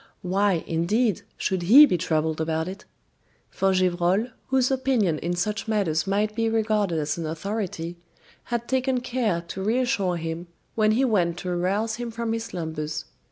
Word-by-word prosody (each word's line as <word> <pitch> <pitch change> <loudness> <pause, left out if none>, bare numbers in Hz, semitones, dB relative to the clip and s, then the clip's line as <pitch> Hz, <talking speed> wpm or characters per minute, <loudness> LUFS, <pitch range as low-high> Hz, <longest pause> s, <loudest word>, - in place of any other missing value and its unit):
Why, 190 -1 +1
indeed, 195 +6 +1 0.2
should 190 -2 -1
he 245 +13 +9
be 235 - +1
troubled 160 -2 0
about 160 +1 -1
it? 195 +2 -8 0.7
For 195 0 +1
Gevrol, 185 +4 +2 0.2
whose 265 0 +2
opinion 250 - +1
in 175 +1 -2
such 210 +5 -2
matters 195 -6 0
might 210 +2 +1
be 225 0 +1
regarded 215 -5 +1
as 150 +1 -1
an 165 - -3
authority, 175 0 -4 0.5
had 235 -1 -3
taken 260 -1 +1
care 240 -8 -1
to 190 - -5
reassure 210 -5 +1
him 165 +1 -5 0.3
when 215 -1 +3
he 260 +4 +3
went 175 -8 +1
to 185 - -4
arouse 195 +6 0
him 240 -1 -4
from 230 0 -3
his 225 0 -3
slumbers. 160 -5 -4
195 Hz, 160 wpm, -25 LUFS, 170-225 Hz, 0.7 s, he